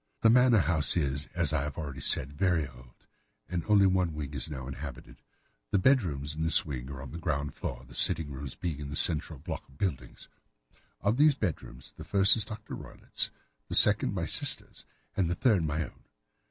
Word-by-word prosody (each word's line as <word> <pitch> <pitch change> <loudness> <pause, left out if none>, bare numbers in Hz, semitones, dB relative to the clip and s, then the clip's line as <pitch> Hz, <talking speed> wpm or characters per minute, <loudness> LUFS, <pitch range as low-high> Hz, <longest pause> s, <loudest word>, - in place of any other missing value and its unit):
The 110 - +6
manor 125 -3 +5
house 80 -1 +2
is, 70 -2 -1
as 85 -4 +1
I 75 - +1
have 75 0 -5
already 70 -4 -6
said, 70 +1 +3
very 85 -1 +1
old, 60 -1 -18 0.4
and 90 -2 -3
only 105 -2 +5
one 90 -4 +1
wing 75 -2 -5
is 70 +3 -4
now 65 -4 -6
inhabited. 70 0 -9 0.5
The - - +2
bedrooms 85 - +2
in 80 - -5
this 80 0 +3
wing 65 -4 -6
are 70 -1 -7
on 65 - -9
the 85 - -7
ground 70 -3 -2
floor, - - -6
the - - -15
sitting 80 -4 +1
rooms 70 -1 -7
being 80 -5 -4
in 70 -1 -6
the 70 - -5
central 80 -1 +2
block 80 +3 -6
of 70 - -20
the 100 - +1
buildings. 65 -9 -6 0.7
Of 105 +4 +1
these 150 0 +5
bedrooms 70 - -5
the - - -11
first 100 0 +5
is 110 - +2
Dr. 105 -1 -8
Roylott's, - - -3 0.4
the - - -4
second - - +6
my - - -1
sister's, - - -3 0.3
and 90 -4 +1
the 85 - -1
third 105 -4 +2
my 80 +1 -1
own. - - -12
80 Hz, 205 wpm, -29 LUFS, 70-95 Hz, 0.7 s, The